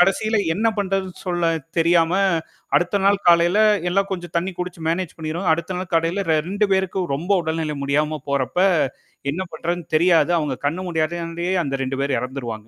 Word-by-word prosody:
கடைசியில 205 +4 +3 0.2
என்ன 220 +5 +2
பண்றது 195 -1 -1 0.2
சொல்ல 175 -2 +1 0.3
தெரியாம, 165 0 +3 0.6
அடுத்த 180 +3 +1
நாள் 200 0 +2
காலைல 170 +3 +5 0.3
எல்லாம் 195 +2 +1
கொஞ்சம் 175 -2 -6
தண்ணி 185 +3 -3
குடிச்சு 180 -1 -5
மேனேஜ் 175 0 -3
பண்ணிருவாங்க. 160 +3 0
அடுத்த 170 +3 -5
நாள் 185 -1 -6
கலைல 170 +4 0 0.2
2 205 +2 +1
பேருக்கு 190 0 0
ரொம்ப 170 +7 -7
உடல்நிலை 160 -2 -2
முடியாம 150 +2 0
போறப்ப, 140 +4 -1 0.7
என்ன 180 +5 -3
பண்றதுன்னு 170 +1 -3
தெரியாது. 170 +1 +4
அவங்க 145 -4 -2
கண்ணு 160 +6 -1
முன்னாடியே 170 +2 -2
அந்த 135 -1 -2
2 135 +1 -3
பேர் 140 -2 0
இறந்துருவாங்க. 125 -2 -4
170 Hz, 155 wpm, -21 LUFS, 155-185 Hz, 0.7 s, காலைல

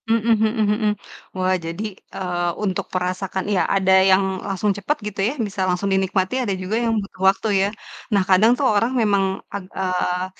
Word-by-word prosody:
Mhm 230 0 +2
mhm 220 0 +1
mhm. 215 0 0 0.5
Wah 185 0 +1
jadi, 170 +5 -4 0.3
eee, 175 -2 -1
untuk 190 -3 -1
merasakan 185 +1 -2
ya 180 - +3
ada 190 -1 +2 0.2
yang 190 +1 +5 0.2
langsung 200 +2 0
cepet 290 +10 -1
gitu 205 -1 -7
ya, - - -3
bisa 195 -1 -5
langsung 180 +2 0
dinikmati 190 +3 0
ada 215 -6 -1
juga 185 +4 -2
yang 230 - +1
butuh 195 -1 -13
waktu 195 +3 -1
ya. 195 - +3 0.5
Nah, 200 -2 +4
kadang 200 +5 +6
tuh 280 - 0
orang 230 +4 +2
memang 200 -3 +2 0.3
ag 200 - -4
eee, 185 -1 -1
195 Hz, 180 wpm, -21 LUFS, 185-215 Hz, 0.5 s, kadang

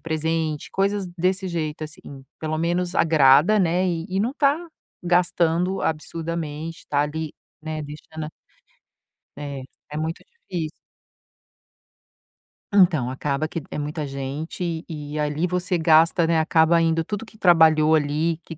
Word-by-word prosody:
presente, 160 -1 -2
coisas 195 0 0
desse 185 +2 +1
jeito 155 -3 -3
assim. 150 -4 -11 0.2
Pelo 155 0 -2
menos 175 +2 -1
agrada, 160 +6 +5
né, 180 +1 +2
e 170 -2 -2
e 190 - -1
não 235 +4 +1
está 285 0 +2 0.5
gastando 175 +1 +1
absurdamente, 160 0 -3
está 145 - -1
ali, 150 +1 -2 0.3
né, 155 -1 -4
deixando 155 +1 -8
a - - -8 1.1
É, 140 -2 -6 0.3
é 150 - -6
muito 160 +1 -3
difícil. 180 - -6 2.0
Então 170 -11 +4
acaba 140 +3 -2
que 165 +1 -5
é - - -4
muita 150 +1 -3
gente, 155 +5 -4
e 150 -1 -6
ali 150 +3 0
você 180 0 -1
gasta, 165 +1 +4
né, 165 -1 +3
acaba 160 +1 +4
indo 165 0 +2
tudo 205 +6 -5
que 215 -1 -18
trabalhou 160 -4 +5
ali, 155 +2 0
que 165 - -9
160 Hz, 135 wpm, -23 LUFS, 155-175 Hz, 2.0 s, agrada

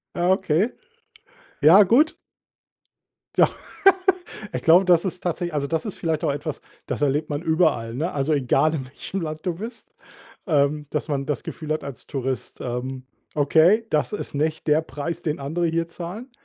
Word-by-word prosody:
Ah, 175 +2 +2
okay. 190 +3 +1 0.9
Ja, 165 +8 +8
gut. 255 - +3 1.2
Ja, - - +5 1.0
ich - - -2
glaube, 175 +4 +6
das 175 -2 +5
ist 180 -1 -4
tatsächlich 175 -1 -2
also, 140 -1 -1
das 160 +5 -2
ist 210 - -5
vielleicht 160 -1 -1
auch 150 - +2
etwas, 145 +1 -4 0.3
das - - -3
erlebt 145 +2 +1
man 145 +1 -2
überall, 160 -9 +1
ne, 165 +7 -1
also, 145 +2 0
egal, 140 +3 +2
in 135 -4 -3
welchem 175 +8 -6
Land 155 0 -5
du 175 -2 -1
bist, 225 +7 -9 0.5
ähm, 145 0 +1
dass 150 +1 -2
man 140 -1 -1
das 145 -3 -2
Gefühl 155 -1 -4
hat 155 - -3
als 140 -4 -8
Tourist, 130 -1 -4
ähm: 130 +1 -4 0.3
„Okay, 165 +9 +4
das 150 +6 0
ist - - -5
nicht 155 +2 -1
der 150 +2 +4
Preis, 160 +1 -5
den 155 -1 -2
andere 160 +5 -1
hier 165 +1 0
zahlen.“ 185 +9 -8
155 Hz, 170 wpm, -23 LUFS, 145-175 Hz, 1.2 s, Ja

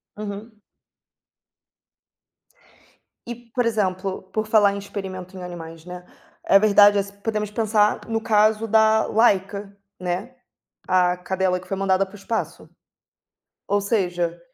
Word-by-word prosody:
Uhum. 210 +2 -7 2.7
E 240 - -5
por 240 +1 -3
exemplo, 195 -4 -1
por 215 0 -1
falar 210 -2 +4
em - - -5
experimentos 190 -2 -7
em 185 - -8
animais, 165 -2 -9
né, 180 0 -9 0.4
a 195 - +6
verdade 205 0 +6
é, 200 - +2
se 200 0 -13
podemos 215 -1 -2
pensar 210 -1 +1
no 225 -1 -1
caso 215 0 +2
da 220 0 +4
Laica, 200 -2 +1 0.2
né, 185 +8 -4 0.5
a 180 -1 +3
cadela 180 0 -1
que 180 - -17
foi 195 - -2
mandada 195 0 +1
para 195 +1 -17
o - - -8
espaço. 220 +3 -4 1.0
Ou 205 0 +1
seja 175 -5 -1
200 Hz, 130 wpm, -22 LUFS, 185-215 Hz, 2.7 s, a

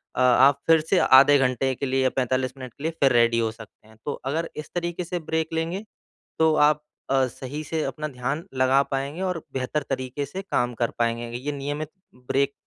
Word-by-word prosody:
अ, - - 0
आप 130 +3 +5
फिर 165 0 +6
से 190 - +4
आधे 140 +2 +7
घंटे 130 0 +1
के 140 - -3
लिए 135 0 +1
या 130 - +3
45 130 0 0
मिनट 130 -3 -9
के 140 - -13
लिए 160 - 0
फिर 135 -2 +4
रेडी 115 -1 +4
हो 115 -1 0
सकते 110 -1 -15
हैं। 110 - -18
तो 145 - -1
अगर 160 +5 -1
इस 150 - -7
तरीके 175 0 -2
से 175 +1 -3
ब्रेक 160 0 -2
लेंगे 165 +5 -2 0.6
तो 160 -1 +4
आप 150 0 +3 0.3
अ, 135 -1 +3
सही 135 +4 -7
से 155 +1 -2
अपना 150 0 -3
ध्यान 135 +3 -3
लगा 130 +1 +4
पाएँगे 140 +5 -3
और 180 -4 -2
बेहतर 135 +3 -2
तरीके 130 +1 -3
से 190 +6 -6
काम 125 -10 -1
कर 120 - +1
पाएँगे। 115 0 0
ये 140 +4 -4
नियमित 145 +2 -4 0.3
ब्रेक 135 +3 -1
140 Hz, 210 wpm, -25 LUFS, 130-155 Hz, 0.6 s, आधे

